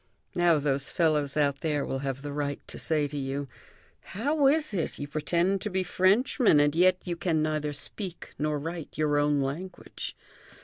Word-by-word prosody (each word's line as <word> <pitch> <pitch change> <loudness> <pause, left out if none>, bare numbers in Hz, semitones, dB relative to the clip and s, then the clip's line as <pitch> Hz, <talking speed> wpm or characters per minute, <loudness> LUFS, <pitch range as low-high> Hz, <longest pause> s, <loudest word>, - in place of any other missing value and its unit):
Now 175 -2 +4
those 140 -2 -1
fellows 150 -4 +1
out 140 -2 +1
there 150 -3 0
will 135 - -3
have 135 0 -4
the 145 -1 -5
right 145 -1 -2
to - - -7
say 155 -2 +1
to 145 +1 -6
you: 135 +1 -3 0.5
'How 280 +7 0
is 305 -2 +2
it; 170 -5 -2
you 145 - -5
pretend 170 +6 0
to 210 - -2
be 190 -1 0
Frenchmen, 195 - +3
and 145 +1 +3
yet 185 +2 +5
you 175 -2 -2
can 165 -3 0
neither 155 -1 -1
speak 175 +5 -3
nor 150 0 0
write 165 +2 -6
your 150 -1 +2
own 145 -1 +2
language?' 160 +8 -5
155 Hz, 180 wpm, -28 LUFS, 145-180 Hz, 0.5 s, yet